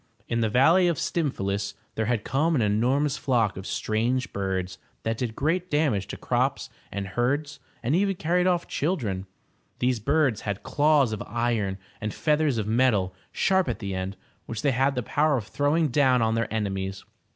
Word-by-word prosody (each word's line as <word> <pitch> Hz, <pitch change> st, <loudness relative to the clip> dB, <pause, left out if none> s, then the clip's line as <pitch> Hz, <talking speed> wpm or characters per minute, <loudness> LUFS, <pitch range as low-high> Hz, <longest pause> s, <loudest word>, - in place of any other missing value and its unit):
In 115 Hz, 0 st, 0 dB
the 110 Hz, -, +2 dB
valley 160 Hz, -, +5 dB
of 170 Hz, -3 st, +1 dB
Stym 165 Hz, -4 st, 0 dB
phalus 100 Hz, -1 st, -3 dB, 0.2 s
there 110 Hz, -1 st, -1 dB
had 115 Hz, -3 st, 0 dB
come 155 Hz, +5 st, +1 dB
an 125 Hz, -, +2 dB
enormous 130 Hz, +8 st, +1 dB
flock 120 Hz, -8 st, +1 dB
of 95 Hz, 0 st, -7 dB
strange 120 Hz, +4 st, -1 dB
birds 95 Hz, -1 st, -2 dB, 0.2 s
that 115 Hz, 0 st, 0 dB
did 115 Hz, -3 st, -2 dB
great 175 Hz, +5 st, 0 dB
damage 145 Hz, -, +1 dB
to -, -, -6 dB
crops -, -, -1 dB, 0.2 s
and 100 Hz, 0 st, -4 dB
herds, 140 Hz, +7 st, -1 dB, 0.2 s
and 130 Hz, +7 st, +1 dB
even 195 Hz, +1 st, +2 dB
carried 180 Hz, +2 st, +1 dB
off 175 Hz, -2 st, +1 dB
children. 110 Hz, -, -2 dB, 0.5 s
These 125 Hz, -1 st, +1 dB
birds 135 Hz, -1 st, +1 dB
had 100 Hz, -2 st, -4 dB
claws 145 Hz, -5 st, +3 dB
of 110 Hz, -, -4 dB
iron, 115 Hz, -4 st, -1 dB, 0.2 s
and 105 Hz, 0 st, -3 dB
feathers 150 Hz, -4 st, +2 dB
of 110 Hz, -, -1 dB
metal, 110 Hz, -5 st, +2 dB, 0.2 s
sharp 190 Hz, -1 st, +2 dB
at -, -, -2 dB
the 100 Hz, -3 st, -4 dB
end, 95 Hz, +1 st, -4 dB, 0.3 s
which 115 Hz, -2 st, -5 dB
they 140 Hz, -, +3 dB
had 135 Hz, +2 st, +2 dB
the 125 Hz, -, -1 dB
power 150 Hz, +4 st, +2 dB
of 110 Hz, -, -4 dB
throwing 145 Hz, +7 st, +1 dB
down 130 Hz, -2 st, +3 dB
on 110 Hz, 0 st, +2 dB
their 115 Hz, 0 st, -1 dB
enemies. 95 Hz, -3 st, -3 dB
120 Hz, 185 wpm, -26 LUFS, 105-150 Hz, 0.5 s, valley